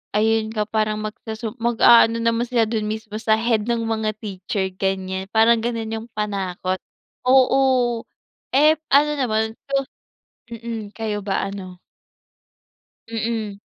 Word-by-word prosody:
ayun 220 +1 +2
nga 210 -1 0
parang 215 -1 0
magsusum 220 +1 -5
mag-aano 230 0 +5
naman 230 +1 +1
sila 235 -2 +2
dun 215 -2 -2
mismo 215 0 -5
sa 220 -1 +3
head 225 -2 +1
ng 235 -1 0
mga 220 -1 -1
teacher, 195 -1 -3
ganyan. 190 0 -2
Parang 225 +1 +5
ganon 230 -2 -2
yung 225 +1 -5
panakot. 190 -3 -2 0.5
Oo. 255 -2 +4 0.5
Ep 305 +2 +5
ano 295 +2 +5
naman 220 -4 +1 0.3
so 275 0 +1 0.7
mm. 230 -2 -6
Kayo 215 -2 -2
ba, 195 -1 -1
ano? 185 -2 -8 1.3
Mm. 220 -3 -3
220 Hz, 125 wpm, -22 LUFS, 210-235 Hz, 1.3 s, mag-aano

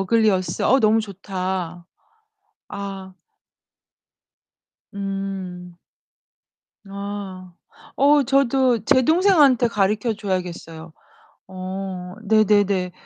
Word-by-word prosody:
어글리어스. 195 -2 +1
어 265 - +4
너무 220 +1 +4
좋다. 185 -4 -5 0.8
아. 195 -2 -7 1.8
음. 195 -3 -6 1.1
아. 195 -2 -7 0.4
어 285 +1 +5
저도 260 -4 +2
제 260 - +4
동생한테 300 - +4
가르쳐 210 +2 0
줘야겠어요. 175 -5 -5 0.6
어 185 -1 -6
네네네. 205 -4 +2
195 Hz, 150 characters per minute, -22 LUFS, 185-225 Hz, 1.8 s, 어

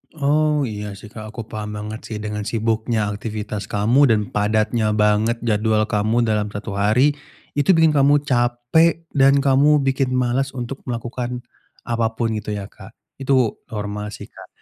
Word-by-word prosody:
Oh, 150 0 +2
iya 105 -4 -5
sih 105 +2 -12
Kak, 110 - -8
aku 115 - -4
paham 105 -1 -5
banget 105 +1 -6
sih 110 - -6
dengan 105 -1 -3
sibuknya 110 -1 0
aktivitas 105 0 -5
kamu 115 +8 +3
dan 110 -3 +3
padatnya 110 +1 +1
banget 105 +2 +2
jadwal 110 -1 +1
kamu 110 +2 +1
dalam 105 -2 0
1 105 +1 -6
hari, 110 +8 +4 0.5
itu 155 +6 +4
bikin 160 -1 +5
kamu 145 0 +3
capek, 125 +6 +2
dan 140 0 +4
kamu 140 +2 +4
bikin 135 -1 0
males 130 +2 0
untuk 125 +2 -5
melakukan 120 +1 -4 0.4
apapun 115 0 -1
gitu 105 0 -5
ya, 100 0 -7
Kak? 105 +4 -14 0.2
Itu 130 -4 +1
normal 105 -1 -5
sih, - - -11
Kak. - - -13
115 Hz, 155 wpm, -21 LUFS, 105-135 Hz, 0.5 s, bikin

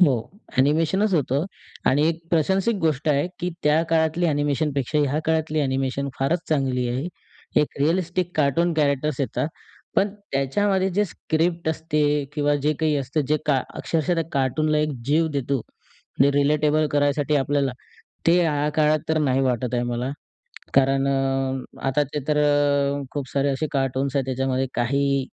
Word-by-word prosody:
हो, 165 -7 +6 0.5
ॲनिमेशनच 165 +9 +2
होतं 140 0 +1 0.5
आणि 145 +3 +3
एक 165 0 -2
प्रशंसिक 190 +7 +2
गोष्ट 155 -1 0
आहे, 145 +1 +2
की 180 0 -2
त्या 150 +2 +3
काळातली 160 +1 +2
ॲनिमेशन 145 0 0
पेक्षा 140 +2 -1
ह्या 145 0 +1
काळातली 160 -1 0
ॲनिमेशन 135 0 -1
फारच 155 +6 +1
चांगली 130 -5 0
आहे. 130 +6 -2 0.5
एक 150 - -3
रिअलिस्टिक 175 +3 0
कार्टून 155 +4 +2
कॅरेक्टर्स 145 -1 0
येतात, 140 +2 -1 0.5
पण 200 +1 +4 0.2
त्याच्यामध्ये 190 +8 +1
जे 205 +4 +1
स्क्रिप्ट 170 -2 -1
असते 160 -1 -1 0.3
किंवा 145 -1 +1
जे 150 +1 +2
काही 155 -2 +2
असतं 140 +2 -1
जे 155 - +3
का 135 -4 +2
अक्षरशः 165 +2 -1
त्या 165 -1 0
कार्टूनला 150 +3 +1
एक 150 0 0
जीव 160 +3 +3
देतो 140 -1 -1
म्हणजे 135 +4 -3
रिलेटेबल 150 +1 +2
करायसाठी 145 0 +1
आपल्याला, 140 -1 +1 0.5
ते 170 +2 +5
ह्या 150 -3 +1
काळात 155 0 +3
तर 160 0 +2
नाही 135 -3 +2
वाटत 125 -2 0
आहे 120 - +1
मला, 120 +1 -2 0.6
कारण 135 0 +3
अ, 135 -1 -1
आता 135 +2 +2
ते 150 - -1
तर 150 -1 +2
अ, 145 -1 +2
खूप 140 -3 -4
सारे 140 0 +1
असे 140 +3 -1
कार्टून्स 135 -1 -1
आहेत, 135 -2 +1
त्याच्यामध्ये 130 0 -1
काही 140 +2 +1
145 Hz, 155 wpm, -23 LUFS, 135-160 Hz, 0.6 s, हो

